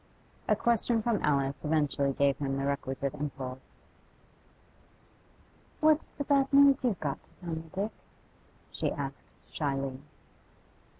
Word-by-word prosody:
A 215 - +4
question 230 0 +1
from 230 -3 +1
Alice 140 -1 +1
eventually 145 -2 +1
gave 140 0 +2
him 135 -1 -1
the 135 - -1
requisite 140 0 -2
impulse. 135 -3 -7 2.0
'What's 310 0 +3
the 285 - -5
bad 275 -1 +2
news 280 -1 +6
you've 230 -8 +1
got 140 -3 -3
to - - -27
tell 175 - -7
me, 160 0 -6
Dick?' 200 +4 -2 0.8
she - - -1
asked 140 -1 -7
shyly. 135 -3 -2
150 Hz, 125 wpm, -30 LUFS, 140-225 Hz, 2.0 s, news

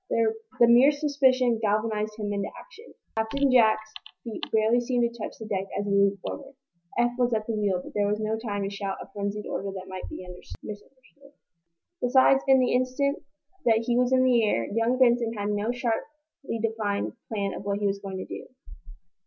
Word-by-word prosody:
The 225 -1 +2 0.3
mere 240 +4 +7
suspicion 265 -5 +2
galvanized 215 0 0
him 205 -1 -3
into 200 0 -2
action. 475 -1 -15 0.2
Captain 260 +5 +1
Jack's 220 -3 +3 0.3
feet 230 -3 -6
barely 220 +2 +3
seemed 240 -1 +1
to 235 - -11
touch 225 - -6
the 220 - -8
deck 195 -2 -2
as 205 - -1
he 205 - -2
leaped 200 -1 +3
forward. 275 +5 -7 0.4
Eph 240 0 +3
was 245 -2 +2
at 215 -1 -2
the 230 - -2
wheel, 200 -4 +1
but - - -11
there 205 -1 +1
was 210 +1 0
no 215 0 -1
time 210 -3 -3
to 195 - -2
shout 200 -1 -4
a - - -10
frenzied 205 +1 -3
order 195 - -3
that 190 -1 -7
might 185 -1 -7
be - - -7 0.4
misunderstood. 265 +6 -12 0.7
Besides, 260 +2 +4
in 265 -1 +6
the 255 - +2
instant 255 +3 0 0.4
that 225 -1 +4
he 240 - +1
was 250 +1 +2
in 260 0 +4
the 245 -3 +4
air, 115 - +1
young 230 +3 +1
Benson 240 -2 +3
had 205 -2 -3
no 210 +2 0
sharply 275 +3 -4
defined 215 -2 -1 0.2
plan 200 -3 -2
of - - -7
what 200 0 -1
he 205 - -2
was 200 0 0
going 195 -1 -6
to 185 - -5
do. - - -8
225 Hz, 195 wpm, -26 LUFS, 205-250 Hz, 0.7 s, mere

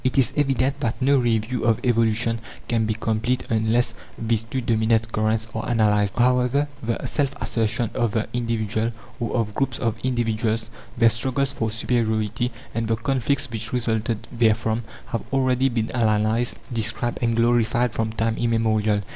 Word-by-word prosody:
It 130 +1 0
is 135 - +3
evident 135 -1 +1
that 120 -5 -2
no 140 +1 +4
review 120 0 0
of 115 -2 +3
evolution 115 -1 +2 0.3
can 115 -2 +1
be 110 - 0
complete, 110 +3 0
unless 115 +2 +2 0.2
these 115 -1 0
two 115 +4 -4
dominant 115 -1 +1
currents 110 +1 0
are 110 - -3
analyzed. 105 -3 +2
However, 125 +3 +3
the 115 0 -2
self 140 -3 -1
assertion 115 0 0
of 115 -3 0
the 110 -1 0
individual 115 -1 -1 0.3
or 120 - -2
of 110 -3 0
groups 135 -1 -1
of 115 -1 -1
individuals, 115 -2 0 0.3
their 115 -1 +6
struggles 130 +4 0
for 115 -4 -1
superiority, 115 0 0 0.2
and 115 0 -1
the 115 - +2
conflicts 135 +4 0
which 115 0 -5
resulted 115 -2 -1
therefrom, 110 0 +2 0.3
have 115 - -1
already 130 0 +2
been 115 -2 -1
analyzed, 110 0 +1 0.2
described, 115 +1 -1
and 115 -1 +1
glorified 120 0 +2
from 110 -1 -1
time 115 0 -1
immemorial. 110 -3 +1
115 Hz, 155 wpm, -23 LUFS, 110-120 Hz, 0.3 s, their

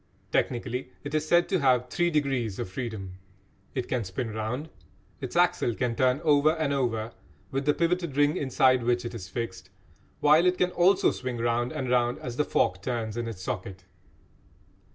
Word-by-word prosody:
Technically, 125 +1 -1
it 145 0 -6
is 155 0 0
said 175 +2 +4
to 190 - +1
have 125 -3 +3
"three 175 +7 +1
degrees 135 - 0
of - - -3
freedom." 95 -3 -6 0.6
It 130 -2 -2
can 125 -3 -1
spin 110 +5 -4
round, 115 +8 -3 0.5
its 130 -3 -6
axle 175 -9 +2
can 125 -3 -1
turn 130 +2 +2
over 150 0 +4
and 155 -4 -1
over 115 -4 -1 0.4
with 135 +1 -2
the 150 - +5
pivoted 170 -4 0
ring 145 +1 +4
inside 130 -2 +3
which 120 +1 0
it 120 - -5
is 100 -6 -7
fixed, 95 -2 -5 0.5
while 155 +4 +5
it 180 0 +2
can 180 0 +1
also 185 +3 +4
swing 125 -1 -4
round 120 +1 0
and 145 -5 -3
round 120 -1 +2
as 120 -2 -6
the 150 - +2
fork 90 0 +1
turns 110 -1 -3
in 120 0 -3
its 100 -5 -7
socket. 95 0 -5
125 Hz, 180 wpm, -27 LUFS, 115-150 Hz, 0.6 s, the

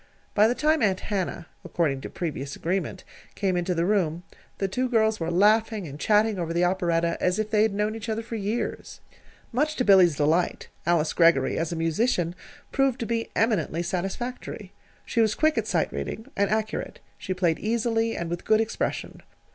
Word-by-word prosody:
By 210 +1 +5
the 240 - 0
time 310 +1 +2
Aunt 195 -3 +2
Hannah 185 -4 -3 0.2
according 140 -6 -1
to - - -6
previous 145 -5 -4
agreement 180 0 -2 0.3
came 190 -3 0
into 175 0 0
the 165 +1 +1
room, 175 -4 0 0.3
the 195 - 0
two 255 +7 -1
girls 220 -2 +2
were 165 0 -2
laughing 210 +3 +3
and 145 +1 -9
chatting 210 0 +2
over 165 -1 -2
the 175 +1 +2
operetta 170 -2 0
as 180 +1 +1
if 215 0 -2
they 210 -1 +3
had 215 -2 +2
known 210 +1 0
each 225 0 -6
other 220 +1 -2
for 230 - -9
years. 215 +2 -3 0.5
Much 300 +5 0
to 250 - 0
Billy's 185 -6 +6
delight, 155 +5 +1 0.2
Alice 170 -2 +2
Greggory, 165 -6 +4
as 165 0 -1
a - - -2
musician, 165 +2 0 0.4
proved 270 -2 +1
to - - -1
be 230 0 -2
eminently 195 -7 +1
satisfactory. 195 +8 -4 0.3
She 230 - +1
was 215 -1 +2
quick 310 +1 +2
at - - -1
sight - - 0
reading, 220 - -5
and 200 -1 +1
accurate. 215 +1 -2 0.2
She 185 - -3
played 175 -3 +1
easily, 225 0 0
and 170 - -3
with 175 +1 -4
good 215 - +3
expression. 225 0 -3
195 Hz, 185 wpm, -26 LUFS, 170-225 Hz, 0.5 s, Billy's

